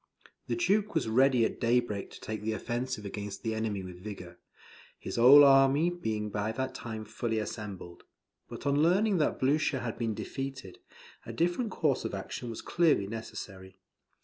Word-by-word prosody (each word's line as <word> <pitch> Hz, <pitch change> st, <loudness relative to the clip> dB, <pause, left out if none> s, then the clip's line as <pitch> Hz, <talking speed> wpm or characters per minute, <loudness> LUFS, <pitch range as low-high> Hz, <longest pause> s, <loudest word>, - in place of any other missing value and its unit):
The -, -, -1 dB
Duke 215 Hz, -, +1 dB
was 155 Hz, -8 st, +1 dB
ready 125 Hz, +1 st, +4 dB
at -, -, -4 dB
daybreak 115 Hz, -4 st, 0 dB
to -, -, -12 dB
take 110 Hz, -1 st, -5 dB
the 110 Hz, +1 st, -2 dB
offensive 120 Hz, 0 st, -3 dB
against 100 Hz, 0 st, -6 dB
the 110 Hz, -1 st, -1 dB
enemy 110 Hz, -3 st, -2 dB
with 90 Hz, -1 st, -10 dB
vigour, 105 Hz, -2 st, -8 dB, 0.6 s
his -, -, -6 dB
whole 135 Hz, +5 st, +9 dB
army 140 Hz, +4 st, +5 dB
being 110 Hz, -11 st, -3 dB
by 105 Hz, +1 st, -1 dB
that 130 Hz, +3 st, -3 dB
time 110 Hz, -2 st, -6 dB
fully 110 Hz, +1 st, -3 dB
assembled. 100 Hz, -5 st, -6 dB, 0.5 s
But -, -, -9 dB
on 140 Hz, +1 st, +2 dB
learning 190 Hz, +5 st, +3 dB
that 150 Hz, -, +1 dB
Blucher 140 Hz, 0 st, +1 dB
had 115 Hz, -2 st, -5 dB
been 115 Hz, -2 st, -1 dB
defeated, 135 Hz, -8 st, -6 dB, 0.4 s
a -, -, -7 dB
different 175 Hz, +8 st, 0 dB
course 150 Hz, -8 st, 0 dB
of -, -, -3 dB
action 110 Hz, +5 st, -6 dB
was 115 Hz, -, -7 dB
clearly 165 Hz, -, +2 dB
necessary. 95 Hz, -3 st, -8 dB
120 Hz, 170 wpm, -30 LUFS, 105-140 Hz, 0.6 s, whole